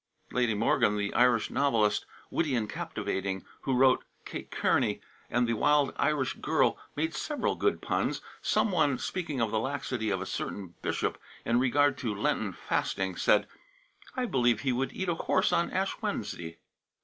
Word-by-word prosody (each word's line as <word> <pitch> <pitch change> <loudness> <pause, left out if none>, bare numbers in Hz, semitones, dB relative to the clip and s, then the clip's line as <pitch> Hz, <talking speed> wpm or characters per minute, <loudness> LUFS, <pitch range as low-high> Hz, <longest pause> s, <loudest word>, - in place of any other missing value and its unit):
Lady 120 -3 +1
Morgan, 105 -1 +2
the 100 0 -2
Irish 120 -2 +3
novelist, 115 -7 +2 0.2
witty 150 -5 +1
and 110 -3 0
captivating, 95 -1 -3 0.2
who 135 - 0
wrote 130 0 +5 0.2
"Kate - - -6
Kearney" - - +1 0.3
and 120 0 +2
the 115 - 0
"Wild 145 +5 +3
Irish 145 -4 +1
Girl," - - +2 0.2
made 160 +2 -1
several 300 -2 -1
good 415 - 0
puns. - - 0 0.2
Some 220 - +2
one, 145 -7 +2
speaking 160 -5 -3
of 115 -2 +1
the 110 - +1
laxity 130 -3 -2
of 95 -2 0
a 95 - -4
certain 95 -2 -5
bishop - - -1 0.3
in 120 +1 +3
regard 140 +2 +3
to 115 -5 -2
Lenten 100 - 0
fasting, 95 -1 -2
said: - - +3 0.7
"I 255 -2 0
believe 120 - +2
he 135 - +1
would 130 +2 -1
eat 190 - -4
a 175 - +2
horse 165 - +1
on - - +2
Ash - - -1
Wednesday." 85 -1 -4
125 Hz, 165 wpm, -29 LUFS, 105-145 Hz, 0.7 s, wrote